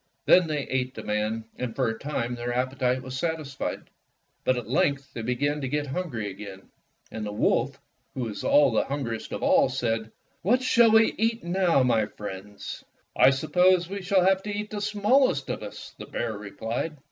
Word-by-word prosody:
Then 180 -2 +6
they 150 -2 -1
ate 130 -1 -2
the - - -7
man, 110 +1 -1
and 125 -3 -3
for 130 -3 +1
a 115 0 -3
time 125 -4 -2
their 120 0 -3
appetite 130 0 0
was 130 -1 -6
satisfied. 155 -2 -3 0.6
But 130 - +2
at 120 -4 -5
length 135 +2 0
they 115 - -5
began 145 +5 -1
to 135 - -2
get 145 +2 -1
hungry 135 - -3
again, 95 0 -10 0.4
and 110 - -5
the 105 - -4
wolf 105 - +1
,r - - -26 0.4
who 130 - -3
was 110 -4 -4
the 135 -6 +4
hungriest 130 -5 -4
of - - -4
all, - - +4
said, 115 -4 -2 0.3
"What 250 +8 +2
shall 235 -2 +5
we 225 0 +5
eat 225 +1 +1
now, 175 -5 +2
my 115 -4 +2
friends?" 105 0 -8 0.3
"I - - +7
suppose 175 +6 +3
we 200 +2 -5
shall 185 -1 +3
have 190 0 +4
to 210 - -7
eat 210 +1 -4
the 210 -1 -4
small 215 +7 +3
est 140 -5 -3
of - - -7
us," - - -9
the - - -8
bear 115 -2 -3
replied. 115 +9 -4
135 Hz, 195 wpm, -26 LUFS, 115-180 Hz, 0.6 s, I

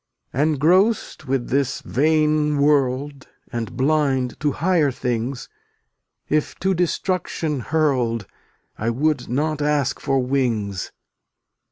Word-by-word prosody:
Engrossed 155 - +2
with 130 -2 -1
this 135 -1 0
vain 150 +1 +2
world 140 -1 +1
(F}tt\/\Y 120 - -10
And 115 -3 -6
blind 135 -3 +1
to 145 -2 0
higher 165 -3 +2
things, 125 0 -3 0.8
If 155 0 0
to 190 +1 +2
destruction 170 -3 -1
hurled 125 -6 0 0.6
\*}*l' 110 - -3
I - - +3
would 135 +1 0
not 150 +4 -1
ask 145 -2 +1
for 135 - 0
wings. 120 -7 -1
140 Hz, 115 wpm, -22 LUFS, 125-155 Hz, 0.8 s, I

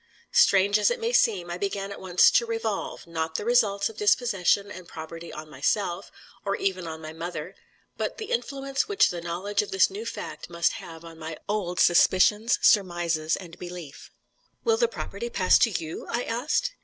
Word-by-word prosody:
Strange 205 - +5
as - - +4
it 485 0 -2
may 460 +2 -1
seem, 190 - +2
I 175 - -4
began 200 0 -3
at - - -8
once 180 -1 +5
to 235 - +3
revolve, 225 -3 -3
not 160 -1 -3
the 205 - -2
results 210 -4 +3
of 225 - -10
dispossession 205 -2 +2
and 180 -1 -10
poverty 165 +1 -8
on 155 0 -8
myself, 175 +6 -1 0.3
or 200 0 0
even 185 -3 -2
on 160 0 -7
my 155 0 -7
mother, 165 +1 -6 0.4
but - - -3
the 435 -2 -6
influence 275 +3 -1
which 410 0 +3
the 175 -1 -5
knowledge 185 +5 -1
of 210 - -6
this 190 -1 +3
new 425 +4 -6
fact - - -7
must 170 -1 +1
have 165 0 -9
on 165 -1 -12
my 160 0 -6
old 190 -4 -2
suspicions, 205 +6 +4
surmises, 175 -5 +3
and 170 -3 -11
belief. 175 -5 -9 0.5
"Will 455 -1 +3
the 475 - +3
property 475 0 -6
pass 470 - +4
to 235 - +4
you?" 165 -5 -5
I 240 +1 -1
asked. 290 - -1
195 Hz, 185 wpm, -26 LUFS, 170-230 Hz, 0.5 s, Strange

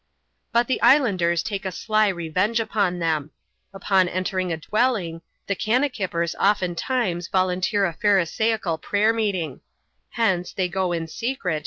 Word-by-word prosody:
But 235 0 +3
the 260 - -1
islanders 195 - +3
take 205 -2 -4
a 190 - -3
sly 215 +2 +1
revenge 185 +5 0
upon 200 -5 0
them 160 -3 -1 0.4
Upon 195 -2 +1
entering 185 0 -2
a 165 - -1
dwelling, 195 -3 -1 0.2
the 200 - -1
kannakippers 215 - 0
oftentimes 190 -1 0
volunteer 185 +2 +1
a 170 - -2
Pharisaical 200 -1 +1
prayer 210 +6 +1
meeting: 190 - -2 0.5
hence, 190 -6 0
they 185 -2 0
^o 185 -1 -1
m 165 - -4
^clx^X. 180 - -3
190 Hz, 135 wpm, -23 LUFS, 175-215 Hz, 0.5 s, But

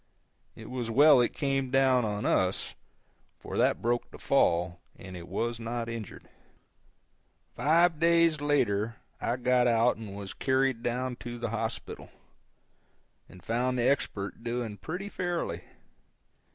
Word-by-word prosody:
It - - -10
was 125 -3 -3
well 140 +2 +7
it 120 - +1
came 135 -2 -1
down 130 -2 +3
on 105 -1 -3
us, 95 0 +1 0.6
for - - -8
that - - +2
broke 120 +1 0
the - - -12
fall, 90 -9 +1
and 95 -1 -10
it 85 -1 -9
was 115 +5 -2
not 115 0 -3
injured. 115 -4 -7 1.3
Five 165 +1 +3
days 165 -2 +3
later 115 -7 +1 0.3
I 120 - 0
got 125 0 +3
out 115 +1 +3
and 105 -3 -8
was 100 -1 -7
carried 130 -2 +1
down 125 +1 -2
to 120 -1 -7
the 120 -2 -4
hospital, 115 0 -4 1.2
and 90 - -15
found 125 +3 0
the 120 0 +2
Expert 105 -6 -1
doing 120 -3 -3
pretty 180 - -5
fairly. 175 - -3
120 Hz, 140 wpm, -29 LUFS, 110-135 Hz, 1.3 s, well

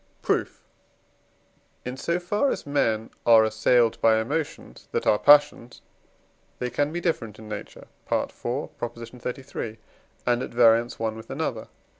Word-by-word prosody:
Proof. - - -1 1.2
In 125 +1 -4
so 170 +6 -1
far 205 +10 0
as - - -3
men 115 -6 0
are 115 -1 +7
assailed 110 +2 +2
by 110 -1 +5
emotions 145 +8 -4
that - - -1
are 105 - +3
passions, 145 -5 +4 0.8
they 125 -1 -3
can 145 +4 0
be 170 - -3
different 115 - -2
in 110 - -11
nature 105 -1 -8 0.3
(IV. - - 0
xxxiii.), 120 -1 -6 0.5
and 120 0 +2
at - - -4
variance 115 0 +3
one 110 -1 -2
with 110 - -11
another. - - -3
120 Hz, 135 wpm, -25 LUFS, 110-140 Hz, 1.2 s, are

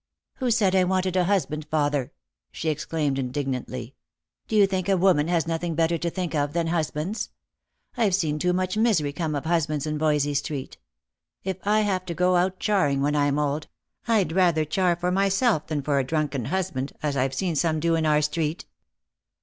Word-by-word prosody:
" - - -64
Who 255 -2 0
said 215 -5 +3
I 190 -1 +4
wanted 185 0 0
a 180 -1 +3
husband, 160 -6 -1
father 145 -4 0 0.2
?" - - -60
she 160 - -3
exclaimed 150 -2 -1
in 130 -2 -2
dignantly. 130 -2 -4 0.3
" - - -58
Do 220 - -2
you 205 -2 +7
think 190 -1 -2
a 195 - +3
woman 175 -5 +3
has 170 -2 +1
nothing 165 0 -2
better 165 +1 +1
to 170 - -1
think 180 -1 -4
of 145 -1 0
than 170 -1 0
husbands? 165 +5 -2 0.7
I've 215 -7 +2
seen 155 -5 -1
too 180 +2 +1
much 185 +1 -1
misery 205 -11 +2
come 155 -1 -2
of 140 - -3
hus 165 -2 +1
bands 150 -2 -2
in 150 -1 -2
Voysey 150 -2 +1
street. 140 -1 -4 0.6
If 190 -1 -3
I 215 +1 +4
have 190 -3 0
to 170 - -4
go 180 +2 +3
out 185 +1 +1
charing 180 -10 +1
when 145 +1 +1
I'm 145 -1 +2
old, 150 +1 -1 0.4
I'd 215 -7 +2
rather 170 -3 +3
char 180 +3 +1
for 175 +1 -1
myself 195 - +2
than 150 -3 -2
for 140 -1 +1
a - - +1
drunken 145 -3 -1
husband, 140 -4 -2
as 145 -2 0
I've 135 0 0
seen 175 +1 -1
some 160 +1 +1
do 165 +1 +1
in 160 -1 +1
our 150 0 +3
street." 150 +2 -2
165 Hz, 205 wpm, -25 LUFS, 150-185 Hz, 0.7 s, you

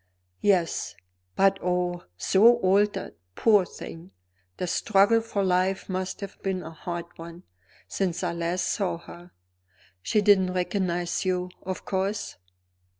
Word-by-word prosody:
"Yes. 185 -5 +1 0.4
But 195 0 +3
oh, 180 0 -1
so 215 - +5
altered, 205 0 +1 0.2
poor 210 -4 +4
thing! 165 +3 -10 0.5
The - - -2
struggle 205 +5 +3
for 215 -3 -2
life 185 +1 +1
must 185 +1 -3
have 195 -1 -8
been 190 -2 -2
a 160 - -8
hard 170 +1 -5
one, 170 +2 -10 0.4
since 180 -2 -2
I 175 -1 -1
last 170 +1 -1
saw 185 -1 -1
her." 175 +1 -13 0.7
"She 210 - +1
didn't 190 -3 +4
recognize 180 -1 -1
you, 180 -1 -1
of 185 0 -5
course?" 195 +2 -2
185 Hz, 130 wpm, -26 LUFS, 175-195 Hz, 0.7 s, so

